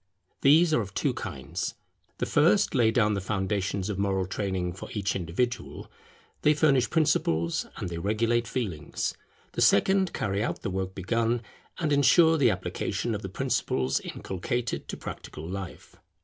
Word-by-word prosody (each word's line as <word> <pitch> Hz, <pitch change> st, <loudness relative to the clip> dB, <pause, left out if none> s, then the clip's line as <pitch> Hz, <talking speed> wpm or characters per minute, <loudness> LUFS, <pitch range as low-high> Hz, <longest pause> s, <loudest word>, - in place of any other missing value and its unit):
These 155 Hz, +4 st, +5 dB
are 135 Hz, -, +3 dB
of 100 Hz, -, -8 dB
two -, -, +1 dB
kinds. 70 Hz, +6 st, -5 dB, 0.4 s
The -, -, -1 dB
first 175 Hz, +8 st, +3 dB
lay 120 Hz, -5 st, +4 dB
down 110 Hz, -2 st, +2 dB
the 100 Hz, -, -1 dB
foundations 95 Hz, -1 st, -1 dB
of 105 Hz, -2 st, -3 dB
moral 95 Hz, -1 st, +1 dB
training 95 Hz, -2 st, -2 dB
for 95 Hz, -, -9 dB
each 100 Hz, -2 st, -1 dB
individual: 100 Hz, +8 st, -3 dB, 0.5 s
they 150 Hz, 0 st, +4 dB
furnish 140 Hz, -5 st, +3 dB
principles, 85 Hz, -, +1 dB
and -, -, -3 dB
they 85 Hz, -1 st, -5 dB
regulate 115 Hz, +5 st, +1 dB
feelings. 95 Hz, -, -3 dB, 0.4 s
The -, -, -3 dB
second 190 Hz, -, +4 dB
carry 100 Hz, 0 st, -1 dB
out -, -, -3 dB
the 100 Hz, -, -2 dB
work 95 Hz, 0 st, -3 dB
begun, 115 Hz, +4 st, 0 dB, 0.3 s
and 155 Hz, -3 st, 0 dB
ensure 160 Hz, +3 st, +5 dB
the 135 Hz, -, +5 dB
application -, -, -2 dB
of -, -, -3 dB
the -, -, -5 dB
principles 65 Hz, 0 st, 0 dB
inculcated 115 Hz, +5 st, -4 dB
to -, -, -5 dB
practical 80 Hz, +1 st, -8 dB
life. 95 Hz, 0 st, -7 dB
105 Hz, 155 wpm, -27 LUFS, 95-130 Hz, 0.5 s, These